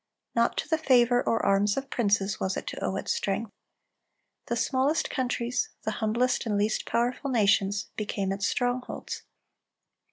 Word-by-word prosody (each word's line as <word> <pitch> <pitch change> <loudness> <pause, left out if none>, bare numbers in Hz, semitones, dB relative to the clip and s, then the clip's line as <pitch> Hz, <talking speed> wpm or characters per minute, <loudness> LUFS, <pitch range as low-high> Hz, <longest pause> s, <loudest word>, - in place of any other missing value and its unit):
Not 235 0 +2
to - - -1
the 320 -1 +1
favor 245 -4 +4
or 225 - 0
arms 200 +2 +3
of 270 0 -4
princes 205 -3 +1
was 190 0 -1
it - - -4
to - - -6
owe 190 - -1
its - - -2
strength. 200 +2 -2 1.0
The 235 - 0
smallest 265 +6 +1
countries, 250 - -1
the - - -1
humblest 235 +3 +1
and 210 -2 +1
least 210 +1 0
powerful 245 +4 0
nations, 205 -4 +2
became 200 -2 -2
its 195 0 0
strongholds. 245 0 -2
230 Hz, 155 wpm, -28 LUFS, 200-250 Hz, 1.0 s, favor